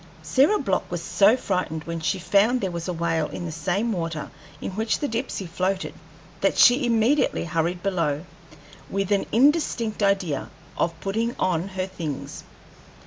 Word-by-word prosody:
Sarah 270 - +4
Block 195 - -1
was 175 - -3
so 205 +7 +4
frightened 180 -8 -2
when 165 0 -4
she 160 +4 0
found 200 +7 +3
there 190 -5 -2
was 170 0 -5
a - - -1
whale 165 -2 0
in 175 - -6
the 165 - -4
same 185 +8 -1
water 165 -5 -3 0.3
in - - -4
which 220 +4 0
the 290 - -2
Dipsey 230 -4 -3
floated 185 +3 -2 0.5
that 195 - +1
she 245 +1 +6
immediately 235 +3 +2
hurried 170 +2 -1
below, 165 -5 0 0.6
with 195 0 -2
an 200 - +2
indistinct 240 -4 +2
idea 195 -8 +1 0.3
of 165 -1 -1
putting 225 +5 -1
on 180 -1 0
her 190 -1 -3
things. 170 -7 -6
190 Hz, 160 wpm, -24 LUFS, 170-220 Hz, 0.6 s, she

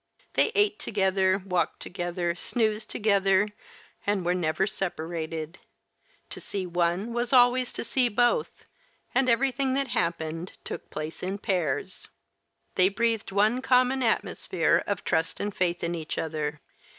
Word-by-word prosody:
They - - +4
ate 415 0 +3
together, 190 -1 +1
walked 180 -2 0
together, 175 -1 -2
snoozed 215 +3 -1
together, 200 -1 +2 0.6
and 200 -3 +1
were 175 - +2
never 170 0 +1
separated; 165 -4 -4 0.7
to - - -6
see 195 -2 -4
one 175 +5 0
was 240 0 -1
always 250 0 +5
to - - -4
see 250 +1 +2
both, 240 - +1 0.5
and 265 -1 +3
everything 265 +2 +2
that 275 -1 0
happened 165 -2 -2
took - - -7
place 155 +1 -6
in 190 +2 -3
pairs. 180 -4 -2 0.7
They 185 +1 +5
breathed 225 0 0
one 215 +6 +2
common 255 +1 +3
atmosphere 175 -7 +1
of 200 -3 -2
trust 160 - 0
and 205 0 -2
faith 175 -1 0
in 170 0 -1
each 160 -3 -5
other. 150 -2 -3
195 Hz, 140 wpm, -27 LUFS, 170-235 Hz, 0.7 s, always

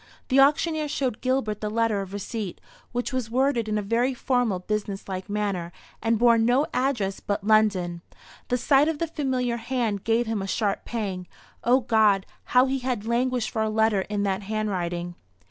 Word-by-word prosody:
The 265 0 +4
auctioneer 305 +2 +3
showed 265 -5 -2
Gilbert 255 -5 0
the 210 - -2
letter 225 -2 +1
of 195 -1 -7
receipt, 205 -1 -5 0.3
which 245 +2 -3
was 255 -4 -2
worded 245 -2 +1
in 215 - 0
a 210 - -1
very 240 +5 +1
formal 245 -6 +1
business 200 +1 -4
like 190 0 -5
manner, 200 -5 -2 0.3
and 225 0 +2
bore 235 0 +5
no 245 +6 +3
address 245 -7 0
but 205 0 -3
"London." 200 -5 +2 0.5
The 250 - +1
sight 275 +4 +4
of 320 -2 -1
the 335 - 0
familiar 260 -6 -1
hand 230 -4 -2
gave 230 +1 +2
him 220 -3 -2
a 195 - -4
sharp 200 0 -1
pang. 195 -6 -4 0.4
O 250 +3 +4
God, 215 -5 +3 0.2
how 250 +1 +4
he 270 0 -1
had 250 -4 -2
languished 245 +1 0
for 220 - -1
a 220 - +1
letter 220 -2 +2
in 205 -1 -1
that 195 -1 0
handwriting! 185 -5 -2
225 Hz, 180 wpm, -25 LUFS, 205-250 Hz, 0.5 s, bore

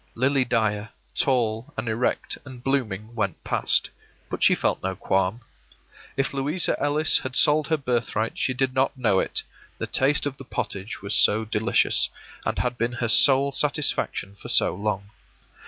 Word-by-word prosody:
Lily 130 +2 +2
Dyer, 110 -3 0 0.3
tall 115 -3 0
and 110 +2 -3
erect 115 +3 -1
and 130 -3 -11
blooming, 115 -6 -2
went 100 -6 -3
past; - - +1 0.4
but - - -4
she - - +5
felt - - -1
no 95 0 -2
qualm. 95 +6 0 0.8
If 135 0 0
Louisa 145 +6 0
Ellis 145 +2 +2
had 130 -1 -6
sold 150 0 +4
her 160 - +1
birthright 120 -4 -1
she 130 - -1
did 130 0 0
not 135 +1 +1
know 110 -7 +2
it, - - -1 0.3
the - - -3
taste 140 +3 +3
of 140 -2 -3
the - - -9
pottage 100 -5 -5
was 100 +2 -3
so 110 +2 +4
delicious, 110 +1 +2 0.4
and - - -1
had 125 -1 -2
been 115 +2 0
her 120 0 -2
sole 135 +4 +5
satisfaction 145 -8 -1
for 100 - -11
so - - +4
long. 100 0 -3
125 Hz, 165 wpm, -24 LUFS, 110-135 Hz, 0.8 s, she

